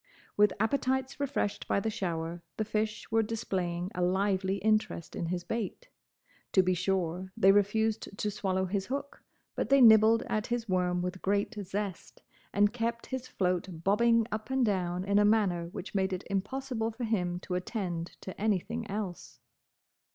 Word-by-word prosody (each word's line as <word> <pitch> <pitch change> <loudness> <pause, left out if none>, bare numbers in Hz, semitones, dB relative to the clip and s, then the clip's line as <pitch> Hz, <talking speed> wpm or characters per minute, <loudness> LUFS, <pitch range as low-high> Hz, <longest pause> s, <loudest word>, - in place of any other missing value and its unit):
With 210 -1 +4
appetites 265 +3 0
refreshed 275 -7 -1
by - - +2
the 220 +2 -1
shower, 170 -3 -3 0.2
the 215 - 0
fish 215 +1 -2
were 225 0 +4
displaying 185 -5 -2
a 180 - -3
lively 190 +1 +1
interest 215 -5 0
in 170 - -2
his 175 0 -2
bait. 230 - -4 0.6
To 190 - +6
be 185 0 +2
sure, 185 0 -1
they 195 - +6
refused 210 +1 +1
to 210 - -1
swallow 190 -2 -1
his 195 +1 -2
hook; 280 +2 -4 0.3
but - - -2
they 275 0 +6
nibbled 225 -1 +7
at 215 +1 -2
his 240 -1 -2
worm 180 -2 +1
with 180 +1 -4
great 200 +3 0
zest, 195 -1 -5 0.3
and 205 +1 +3
kept 235 0 -2
his 255 -1 -3
float 180 -2 -2
bobbing 230 +4 +4
up 215 +2 -4
and 265 -1 +2
down 180 -3 0
in 200 +1 +3
a - - +5
manner 200 -5 +2
which 175 +2 -8
made 190 -1 +1
it 185 - -3
impossible 230 +3 -2
for 230 +2 -6
him 180 -6 0
to 180 - -5
attend 180 -3 -3
to 190 - -8
anything 220 +2 -1
else. 195 -4 -5
205 Hz, 165 wpm, -30 LUFS, 185-225 Hz, 0.6 s, nibbled